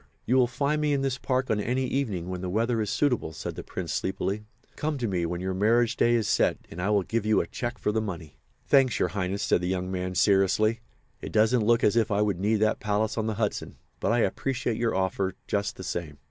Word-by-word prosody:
"You 125 - +2
will 130 -2 +5
find 140 +5 0
me 150 -1 +2
in 135 -1 0
this 135 -1 -1
park 130 -1 0
on 105 - +1
any 125 +5 0
evening 110 -11 -2
when 90 -1 -4
the 90 - -3
weather 115 +4 +1
is 105 - -2
suitable," 125 - 0
said - - -5
the - - -6
Prince, - - -5
sleepily. 100 +2 -2 0.3
"Come 150 -1 -2
to 120 -3 -1
me 90 -4 -1
when 85 +1 -4
your 95 0 -2
marriage 115 +4 +2
day 120 0 +3
is 110 -3 +1
set 105 - +2
and 85 - -6
I 95 - 0
will 105 -2 +3
give 115 +3 -1
you 110 0 +3
a - - 0
cheque 120 0 -4
for - - 0
the 110 +1 0
money." 85 -7 -7 0.3
"Thanks, 135 -4 +4
Your - - +1
Highness," 95 0 -2
said - - +2
the 90 - -2
young 90 0 -2
man, 90 0 -3
seriously. 105 +4 +3 0.4
"It - - -6
doesn't 110 +1 +3
look 120 0 +4
as 105 - +4
if 115 -2 +2
I 105 0 +2
would 100 -4 -1
need 105 +3 +2
that 110 0 +2
palace 105 +1 0
on 110 -1 -1
the 110 - -1
Hudson, - - -2 0.2
but - - 0
I 120 0 +3
appreciate 125 -3 -1
your 115 -3 0
offer, 95 0 -1
just 100 0 -1
the 95 - -8
same." 80 -5 -4
105 Hz, 245 wpm, -27 LUFS, 95-120 Hz, 0.4 s, will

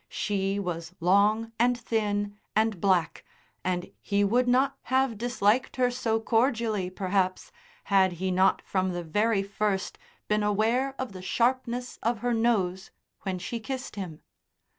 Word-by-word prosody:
She 195 -1 -1
was 175 -2 -4
long 205 +6 +3
and 245 +1 +3
thin 205 -3 -1 0.2
and 220 -4 +1
black, 185 -4 +1 0.4
and 180 -1 -2
he 200 0 +1
would 245 +5 +2
not 265 +3 +3
have 260 -2 +2
disliked 235 +1 +1
her 250 -1 +2
so 235 -3 0
cordially, 225 -4 +1
perhaps, 185 0 -1 0.3
had 190 -2 +3
he 185 +2 -2
not 185 +1 +3
from 185 -1 -1
the 175 0 -3
very 205 +5 +1
first 200 -1 -2 0.3
been 210 0 +2
aware 225 +6 +1
of 260 -3 -4
the 185 -1 -9
sharpness 245 +4 -1
of 235 +1 0
her 245 - +2
nose 195 -5 +1 0.3
when 190 -2 -3
she 210 +6 -4
kissed 255 +2 -5
him. 180 -6 -7
210 Hz, 145 wpm, -27 LUFS, 190-235 Hz, 0.4 s, long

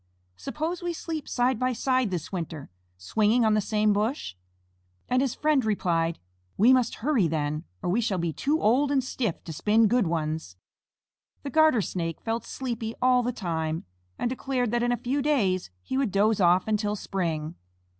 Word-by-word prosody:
Suppose 315 - -4
we 350 -1 -2
sleep 320 -2 -5
side 245 -1 +1
by 255 0 +1
side 255 0 +1
this 175 -4 -4
winter, 165 - -5 0.3
swinging 215 - +2
on 215 - +4
the 215 - +3
same 210 0 +2
bush?" 215 - -1 0.7
And 250 +1 +2
his 270 -3 -1
friend 300 -4 +2
replied: 170 -6 0 0.4
"We 235 +6 +6
must 250 -3 +2
hurry 260 - +3
then, 150 0 -2 0.2
or - - -1
we 225 +6 +2
shall 210 -4 0
be 170 -2 -1
too 295 - 0
old 260 +7 +3
and 270 -2 +2
stiff 235 -7 -3
to 165 - -7
spin 215 +7 +3
good 235 -2 +2
ones." 155 - -3 0.9
The 280 - -5
Garter 315 -8 +4
Snake 165 -4 -3
felt 225 0 -3
sleepy 230 -3 -4
all 255 0 +4
the 245 +1 -1
time, 160 -7 -3 0.3
and - - -1
declared 250 -1 -1
that 240 0 +1
in 240 0 +1
a 245 - +1
few 270 +5 -1
days 205 - +1
he 260 - -2
would 265 -7 0
doze 205 +1 +2
off 180 +2 +4
until 210 -1 0
spring. 165 -6 -3
220 Hz, 180 wpm, -27 LUFS, 180-255 Hz, 0.9 s, We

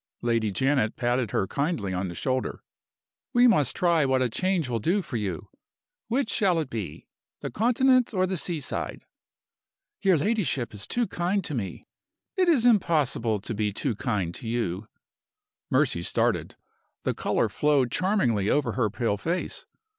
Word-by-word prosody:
Lady 115 -2 +1
Janet 130 0 +1
patted 120 -1 0
her 95 - 0
kindly 140 - -2
on 90 +1 -2
the 85 - -7
shoulder. 130 +5 -2 0.7
"We 245 0 +6
must 170 - +3
try 170 -3 +3
what 130 -1 +2
a 125 - +1
change 185 0 0
will 120 -2 -1
do 185 - +1
for 130 - -7
you. 95 -7 -4 0.6
Which 245 +1 0
shall 190 -6 +2
it 150 -5 -4
be? 95 -10 -5 0.4
the - - -4
Continent 250 - +3
or 185 -4 +1
the 190 +1 -2
sea 165 -1 -1
side?" - - -4 1.0
"Your 190 -3 +4
ladyship 150 - 0
is 100 -1 -7
too 240 0 0
kind 185 +1 -1
to 155 - -5
me." 105 -8 -4 0.5
"It 370 -3 +3
is 265 -8 +4
impossible 150 - +2
to 115 - -5
be 105 -1 0
too 115 +3 -1
kind 100 -6 -2
to 115 - -7
you." 110 -4 -2 0.8
Mercy - - +2
started. - - 0 0.5
The - - 0
color - - 0
flowed 145 -5 +2
charmingly 125 - +1
over 145 -1 +2
her 115 -5 0
pale 115 -1 -1
face. 170 - -3
135 Hz, 160 wpm, -26 LUFS, 110-185 Hz, 1.0 s, We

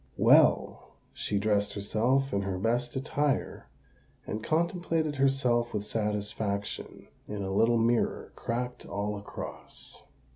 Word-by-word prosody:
Well—she 100 - +2
dressed 100 0 +1
herself 120 +7 +1
in 100 - +1
her 95 -1 -2
best 120 +5 0
attire, 140 +1 -1 0.6
and 105 +1 -4
contemplated 165 - 0
herself 125 -4 +2
with 105 0 -2
satisfaction 105 -1 -3 0.2
in 105 -1 -4
a 95 - -3
little 115 +4 +4
mirror 115 +1 +1
cracked 125 +1 -3
all 105 +1 -3
across. 100 0 -8
115 Hz, 110 wpm, -29 LUFS, 105-135 Hz, 0.6 s, little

